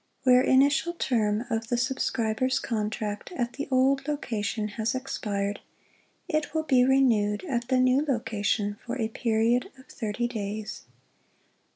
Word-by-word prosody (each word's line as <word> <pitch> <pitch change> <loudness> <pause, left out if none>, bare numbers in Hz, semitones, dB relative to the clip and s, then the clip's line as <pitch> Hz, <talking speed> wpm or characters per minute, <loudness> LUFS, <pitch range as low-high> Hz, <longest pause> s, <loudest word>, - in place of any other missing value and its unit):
Where 250 -1 +6
initial 280 +6 +3
term 225 -7 0
of 225 0 -1
the 240 0 0
subscriber's 255 0 0
contract 210 -2 -3
at 245 -7 -2
the 285 - -5
old 270 +1 +2
location 215 -7 -2
has 220 +2 -2
expired, 205 -6 -3 0.7
it 310 0 -1
will 315 - +1
be 260 -5 +4
renewed 235 -6 +3
at 240 -7 -2
the 260 0 +2
new 255 +3 +4
location 210 -6 -1
for 240 - -4
a 220 -1 0
period 230 +1 +1
of 260 - -16
thirty 230 +1 -2
days. 215 -2 -5
240 Hz, 140 wpm, -27 LUFS, 215-265 Hz, 0.7 s, Where